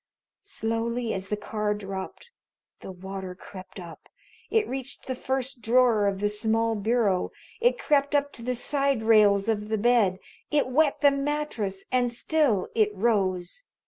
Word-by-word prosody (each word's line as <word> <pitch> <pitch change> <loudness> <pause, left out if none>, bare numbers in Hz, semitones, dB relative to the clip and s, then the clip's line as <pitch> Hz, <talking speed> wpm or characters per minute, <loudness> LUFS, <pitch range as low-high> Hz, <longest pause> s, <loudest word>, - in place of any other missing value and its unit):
Slowly, 230 - -2
as 190 0 -5
the 210 - -1
car 210 0 -2
dropped, 195 - -7 0.5
the - - -8
water 190 0 -7
crept 185 +1 -11
up. 170 -3 -11 0.4
It 440 -1 +2
reached 265 0 -6
the 260 - -2
first 265 0 -3
drawer 230 -2 +3
of 195 0 -2
the 205 - +2
small 225 +2 0
bureau. 215 -3 +1 0.3
It 485 +1 +3
crept 290 - +1
up 285 0 +1
to - - -9
the 250 +2 -2
side 275 -1 0
rails 210 -2 +5
of 210 -1 -1
the 220 - 0
bed. 215 -4 +3 0.3
It 295 -1 +2
wet 295 +3 +2
the 285 -1 +6
mattress 275 -9 -2
and 245 -1 +2
still 240 -5 +1
it 215 -2 +3
rose. 190 - 0
225 Hz, 155 wpm, -26 LUFS, 200-265 Hz, 0.5 s, the